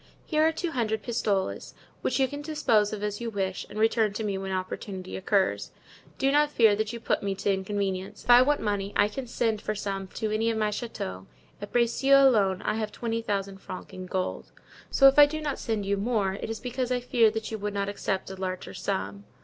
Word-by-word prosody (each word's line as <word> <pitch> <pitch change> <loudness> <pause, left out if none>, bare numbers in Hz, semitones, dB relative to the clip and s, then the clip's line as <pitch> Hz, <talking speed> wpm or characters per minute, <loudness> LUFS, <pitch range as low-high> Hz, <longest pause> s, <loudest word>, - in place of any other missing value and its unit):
Here 310 -2 +1
are 320 +1 +5
two 330 +1 -3
hundred 220 -5 -1
pistoles, 205 -5 -1 0.3
which - - 0
you 265 - +4
can 285 +2 -6
dispose 290 -9 +2
of 210 -1 -5
as 210 +1 -3
you 235 - -2
wish 195 -3 -3
and 210 - -9
return 220 -1 +2
to 220 - -3
me 205 -2 -1
when 190 0 -4
opportunity 185 0 -4
occurs. 190 - +1 0.5
Do 270 +1 +2
not 295 +1 +4
fear 225 -7 +4
that 215 +1 -2
you 235 - -6
put - - 0
me 200 -1 -2
to 200 +1 0
inconvenience; 195 0 -3
if - - -17
I 240 +1 +9
want 290 +3 +2
money 205 -2 -2
I 205 - +4
can 250 +5 -6
send 225 -2 -1
for 215 - -2
some 195 -1 -3
to 220 -2 -2
any 220 +1 +1
of 225 - -1
my 215 -1 +1
chateaux; 95 - -5 0.3
at - - -7
Bracieux 270 +3 +5
alone, 200 -6 +2
I 210 - 0
have 215 -1 -2
twenty 230 -1 -3
thousand 195 -3 -3
francs 185 - -9
in 185 0 -7
gold. 185 0 -3 0.4
So, 275 - +6
if 270 +2 +5
I 290 - +10
do 310 +1 -4
not 295 -3 -3
send 220 -4 -2
you 200 +1 0
more 205 -2 0
it 200 - -5
is 225 -1 -4
because 250 +1 -3
I 250 - +2
fear 240 -3 +3
you 220 0 -4
would 205 0 -3
not 200 0 -1
accept 195 -1 -3
a - - -6
larger 185 -1 -5
sum. 200 +2 -3
215 Hz, 225 wpm, -27 LUFS, 195-240 Hz, 0.5 s, I